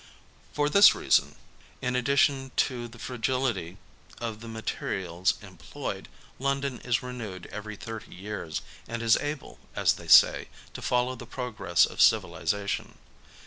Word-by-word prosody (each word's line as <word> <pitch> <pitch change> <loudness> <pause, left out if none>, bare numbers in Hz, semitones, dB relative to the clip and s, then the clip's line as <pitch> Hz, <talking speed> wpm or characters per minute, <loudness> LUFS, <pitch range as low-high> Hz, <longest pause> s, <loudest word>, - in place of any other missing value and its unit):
For 145 0 +1
this 200 +7 +7
reason, - - +2 0.4
in 125 0 -1
addition 135 +1 +2
to 120 -3 0
the 115 0 -14
fragility 120 -7 -2 0.4
of 115 -2 -4
the 115 - -9
materials 95 -5 -2
employed, 90 -6 -7 0.3
London 140 -1 -1
is 120 -1 0
renewed 110 -8 -6
every 105 +1 -6
thirty 110 +1 -8
years, 95 -4 -5 0.2
and 115 0 -4
is 115 -1 +5
able, 145 -1 -5 0.2
as - - +3
they - - -11
say, - - +7 0.3
to - - -7
follow 125 +1 +1
the 120 -2 -10
progress 110 -10 +1
of - - -3
civilization. 100 -1 +1
115 Hz, 135 wpm, -28 LUFS, 100-130 Hz, 0.4 s, this